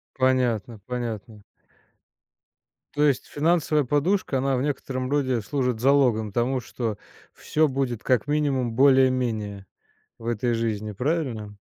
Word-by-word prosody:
Понятно, 125 Hz, -4 st, +1 dB
понятно. 115 Hz, -4 st, -5 dB, 1.5 s
То 145 Hz, -, +1 dB
есть 140 Hz, -4 st, +2 dB
финансовая 155 Hz, -1 st, +1 dB
подушка, 145 Hz, +2 st, +1 dB
она 135 Hz, 0 st, +1 dB
в 125 Hz, -, -1 dB
некотором 135 Hz, -2 st, -3 dB
роде 130 Hz, -5 st, +1 dB
служит 125 Hz, +1 st, -1 dB
залогом 125 Hz, -5 st, +3 dB
тому, 125 Hz, +5 st, 0 dB
что 115 Hz, -3 st, -4 dB, 0.4 s
всё 155 Hz, 0 st, +1 dB
будет 130 Hz, -4 st, -2 dB
как 125 Hz, -4 st, +2 dB
минимум 140 Hz, -5 st, 0 dB
более-менее 125 Hz, -7 st, +2 dB, 0.5 s
в 115 Hz, -, -12 dB
этой 120 Hz, +1 st, 0 dB
жизни. 110 Hz, -2 st, -2 dB
Правильно? 125 Hz, -, -2 dB
130 Hz, 120 wpm, -25 LUFS, 115-140 Hz, 1.5 s, залогом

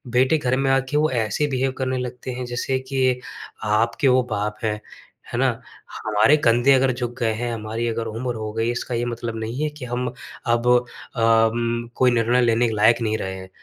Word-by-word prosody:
बेटे 130 Hz, +5 st, +4 dB
घर 130 Hz, -3 st, 0 dB
में 135 Hz, 0 st, +1 dB
आके 135 Hz, +2 st, +1 dB
वो 155 Hz, -1 st, +2 dB
ऐसे 115 Hz, +4 st, 0 dB
बिहेव 130 Hz, 0 st, 0 dB
करने 130 Hz, -1 st, -1 dB
लगते 125 Hz, 0 st, -5 dB
हैं 125 Hz, 0 st, -4 dB
जैसे 120 Hz, +2 st, -2 dB
कि 130 Hz, -1 st, 0 dB, 0.5 s
आपके 115 Hz, +5 st, +1 dB
वो 130 Hz, -1 st, +4 dB
बाप 105 Hz, 0 st, -2 dB
हैं। 105 Hz, -1 st, -1 dB, 0.5 s
है -, -, -1 dB
ना? -, -, +4 dB, 0.6 s
हमारे 110 Hz, +7 st, +4 dB
कंधे 120 Hz, +1 st, +4 dB
अगर 130 Hz, 0 st, +3 dB
झुक 120 Hz, -1 st, -4 dB
गए 115 Hz, -2 st, +1 dB
हैं, 120 Hz, +2 st, -3 dB
हमारी 110 Hz, +1 st, -3 dB
अगर 115 Hz, 0 st, -2 dB
उम्र 120 Hz, +3 st, -3 dB
हो 110 Hz, -1 st, -4 dB
गई 115 Hz, +1 st, 0 dB
इसका 120 Hz, 0 st, -3 dB
ये 120 Hz, +1 st, -1 dB
मतलब 120 Hz, -1 st, -4 dB
नहीं 115 Hz, +6 st, -4 dB
है 155 Hz, -, +1 dB
कि 150 Hz, -3 st, -9 dB
हम 125 Hz, +1 st, -2 dB, 0.4 s
अब 120 Hz, 0 st, +1 dB, 0.5 s
अम, 115 Hz, +1 st, +2 dB
कोई 125 Hz, -1 st, +4 dB
निर्णय 120 Hz, +1 st, +2 dB
लेने 120 Hz, 0 st, +3 dB
के 110 Hz, -, -2 dB
लायक 110 Hz, +3 st, +4 dB
नहीं 110 Hz, -1 st, 0 dB
रहे 95 Hz, -2 st, -4 dB
हैं। 95 Hz, 0 st, -9 dB
120 Hz, 205 wpm, -22 LUFS, 115-130 Hz, 0.6 s, बेटे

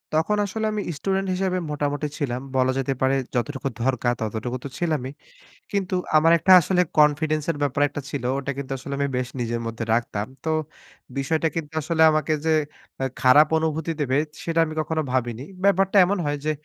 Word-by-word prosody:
তখন 165 Hz, +7 st, +2 dB
আসলে 220 Hz, +3 st, -3 dB
আমি 210 Hz, -, -1 dB, 0.2 s
স্টুডেন্ট 195 Hz, +4 st, -1 dB
হিসেবে 185 Hz, 0 st, 0 dB
মোটামুটি 145 Hz, 0 st, -1 dB
ছিলাম। 130 Hz, -4 st, -2 dB
বলা 130 Hz, 0 st, +3 dB
যেতে 135 Hz, 0 st, 0 dB
পারে 130 Hz, +1 st, +3 dB, 0.2 s
যতটুকু 135 Hz, +2 st, -2 dB, 0.2 s
দরকার 125 Hz, -1 st, +1 dB
ততটুকু 110 Hz, +3 st, -3 dB
তো 140 Hz, -, -5 dB
ছিলামই। 155 Hz, -7 st, -1 dB, 0.6 s
কিন্তু 190 Hz, -2 st, -1 dB, 0.2 s
আমার 165 Hz, +2 st, +5 dB
একটা 170 Hz, +4 st, +2 dB
আসলে 180 Hz, +2 st, +2 dB, 0.2 s
confidence 150 Hz, 0 st, +3 dB
এর 155 Hz, -, -7 dB
ব্যাপার 140 Hz, 0 st, 0 dB
একটা 145 Hz, -, -5 dB
ছিল। 145 Hz, -, -4 dB
ওটা 140 Hz, 0 st, -3 dB
কিন্তু 140 Hz, -1 st, -6 dB
আসলে 140 Hz, +2 st, -7 dB
আমি 140 Hz, -, +1 dB
বেশ 125 Hz, -1 st, -1 dB
নিজের 120 Hz, -1 st, -2 dB
মধ্যে 115 Hz, 0 st, -4 dB
রাখতাম। 115 Hz, -3 st, -1 dB, 0.2 s
তো 160 Hz, -, +1 dB, 0.7 s
বিষয়টা 160 Hz, +4 st, +1 dB
কিন্তু 160 Hz, -2 st, -4 dB
আসলে 160 Hz, +2 st, -1 dB
আমাকে 155 Hz, 0 st, +1 dB
যে, 160 Hz, -, +3 dB, 0.5 s
আ -, -, +1 dB, 0.2 s
খারাপ 140 Hz, +4 st, +7 dB
অনুভূতি 160 Hz, 0 st, -1 dB
দেবে 135 Hz, -1 st, +1 dB, 0.3 s
সেটা 165 Hz, 0 st, 0 dB
আমি 155 Hz, -, -6 dB
কখনো 160 Hz, +1 st, -1 dB
ভাবিনি। 120 Hz, -1 st, -1 dB, 0.2 s
ব্যাপারটা 195 Hz, 0 st, +3 dB
এমন 200 Hz, +3 st, 0 dB
হয় 145 Hz, 0 st, -1 dB
যে, 155 Hz, -, +2 dB
145 Hz, 180 wpm, -24 LUFS, 130-165 Hz, 0.7 s, খারাপ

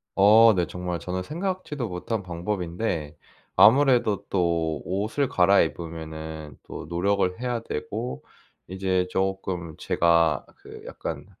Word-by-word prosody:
어 110 Hz, +3 st, +7 dB
네. 90 Hz, -2 st, +1 dB
정말 90 Hz, -1 st, -4 dB
저는 90 Hz, +5 st, -4 dB
생각지도 160 Hz, -, -3 dB
못한 95 Hz, +4 st, -3 dB
방법인데 85 Hz, -3 st, -3 dB, 0.4 s
아무래도 125 Hz, -4 st, +5 dB
또 85 Hz, -4 st, 0 dB
옷을 105 Hz, +9 st, -1 dB
갈아입으면은 80 Hz, -5 st, 0 dB
또 -, -, -7 dB
노력을 90 Hz, +3 st, 0 dB
해야 125 Hz, -2 st, -1 dB
되고 65 Hz, -, -5 dB, 0.4 s
이제 95 Hz, 0 st, 0 dB
쪼끔 95 Hz, -4 st, -2 dB
제가 85 Hz, -2 st, +2 dB
그 -, -, -12 dB
약간 -, -, -6 dB
90 Hz, 240 characters per minute, -25 LUFS, 85-105 Hz, 0.4 s, 어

